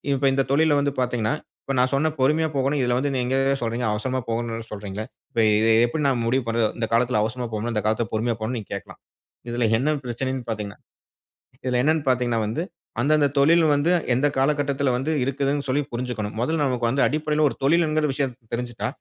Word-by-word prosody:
இப்ப 135 +1 -1
இந்த 135 0 +1
தொழில்ல 155 0 +4
வந்து 140 -1 0
பார்த்தீங்கன்னா, 120 +1 0 0.3
இப்போ 135 - -3
நான் 130 +1 +1
சொன்ன 155 +3 +1
பொறுமையா 155 +4 +3
போகணும். 135 +2 +1
இதில 120 0 +1
வந்து 140 +1 -1
நீங்க 125 +1 0 0.3
சொல்றீங்க. 115 0 -1
அவசரமா 130 +5 -2
போகணும்னு 115 -1 -3
சொல்றீங்களே. 105 0 -5 0.3
இப்ப - - -2 0.2
இதை 110 +1 +3 0.2
எப்படி 150 +5 -2
நான் 120 -3 0
முடிவு 130 +1 +1
பண்றது? 115 -1 +1
இந்த 115 - 0
காலத்தில 120 -2 +2
அவசரமா 120 +2 -3
போகணும், 115 +2 -2
இந்த 105 - 0
காலத்தில் 110 0 0
பொறுமையா 115 +1 0
போகணும்னு 115 +2 -2
நீங்க 105 - -11
கேட்கலாம். 100 - -10 0.5
இதில 120 0 0
என்ன 135 +6 0
பிரச்சனைனு 130 +2 -3
பார்த்தீங்கன்னா, 105 -3 -4 0.9
இதில 125 -1 +1
என்னனு 155 +3 +2
பார்த்தீங்கன்னா 120 -3 +1
வந்து 115 +10 -2 0.4
அந்த 140 +5 +2
அந்த 145 - +4
தொழில் 165 +4 +5
வந்து 145 +4 +2 0.2
எந்த 140 +4 +2
காலகட்டத்தில 140 0 +1
வந்து 135 +5 -1
இருக்குதுனு 140 +2 -1
சொல்லி 145 +3 +1
புரிஞ்சிக்கணும். 120 -4 -3
முதல்ல 155 +5 0
நமக்கு 125 -4 0
வந்து 135 +3 +1
அடிப்படையில 155 +1 0
ஒரு - - -6
தொழில்ங்கிற 155 +1 +2
விஷயம் 135 -1 -1 0.2
தெரிஞ்சிட்டா 120 -1 -3
125 Hz, 185 wpm, -24 LUFS, 115-145 Hz, 0.9 s, தொழில்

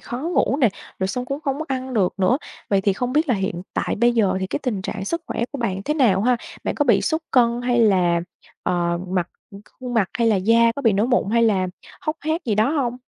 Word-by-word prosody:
khó 240 - -6
ngủ 320 -2 +1
nè, 245 - +5 0.3
rồi 190 - -1
xong 250 +5 -3
cũng 275 +3 -4
không 280 -3 -2
có 315 - -3
ăn 260 -1 -3
được 195 -5 +1
nữa. 195 +8 +3 0.3
Vậy 195 -1 +3
thì 200 0 +2
không 245 +5 -3
biết 310 +2 +2
là 250 - +3
hiện 190 -3 -3
tại - - -1
bây 240 0 +4
giờ 195 -5 +2
thì 190 - -1
cái - - -3
tình 215 -8 -2
trạng 195 0 -4
sức 335 +8 -2
khỏe 235 - -2
của 285 - -5
bạn 195 -6 -2
thế 300 - 0
nào 220 -10 +3
ha? 245 +1 +3 0.3
Bạn - - -1
có 290 - +1
bị 230 -7 +4
sút 320 -1 0
cân 240 -1 +3
hay 245 -1 +2
là, 180 -5 +3 0.4
ờ, 170 -1 0
mặt 180 -1 -1 0.5
khuôn 250 -1 -5
mặt 210 -5 +2
hay 235 - +2
là 215 - +3
da 230 +4 +4
có 280 - -6
bị 225 -5 +4
nổi 205 +4 +2
mụn 240 -5 +1
hay 230 0 +3
là 195 -5 +2 0.3
hốc 310 +1 -2
hác 315 +2 -2
gì 220 -4 0
đó 215 +5 +2
hông? 260 -6 -1
235 Hz, 255 wpm, -22 LUFS, 195-260 Hz, 0.5 s, nè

